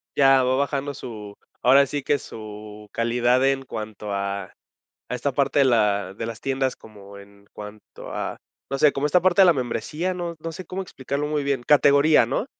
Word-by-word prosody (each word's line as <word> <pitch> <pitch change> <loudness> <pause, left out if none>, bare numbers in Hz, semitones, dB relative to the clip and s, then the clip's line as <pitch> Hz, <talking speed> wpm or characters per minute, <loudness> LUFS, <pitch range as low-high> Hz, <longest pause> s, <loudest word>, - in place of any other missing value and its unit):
Ya, 135 -1 +5
va 130 +1 +1
bajando 140 0 -1
su 105 -5 -9 0.3
ahora 135 +3 +6
sí 145 +1 -4
que 145 +2 +1
su 105 -2 -10
calidad 120 +2 +1
en 135 0 0
cuanto 105 -4 -6
a 100 -1 -3 0.6
a 125 - -2
esta 135 +3 -2
parte 140 +1 +1
de 135 - +5
la 105 -5 +1
de 115 - -5
las 115 -1 -7
tiendas 135 -1 -1
como 100 -2 -14
en 100 0 -16
cuanto 105 0 -11
a - - -4 0.3
no 135 - -2
sé, 150 +1 +5
como 140 +1 -2
esta 170 +4 +3
parte 185 +1 +4
de 190 - +8
la 175 - +6
membresía, 140 +8 -3
no 175 -2 -5
no 165 +1 -5
sé 180 +2 -9
cómo 190 +3 -5
explicarlo 140 -3 -4
muy 150 -1 -1
bien 140 -3 -1
categoría, 145 -1 +5
¿no?, 135 - -2
130 Hz, 195 wpm, -23 LUFS, 110-145 Hz, 0.6 s, de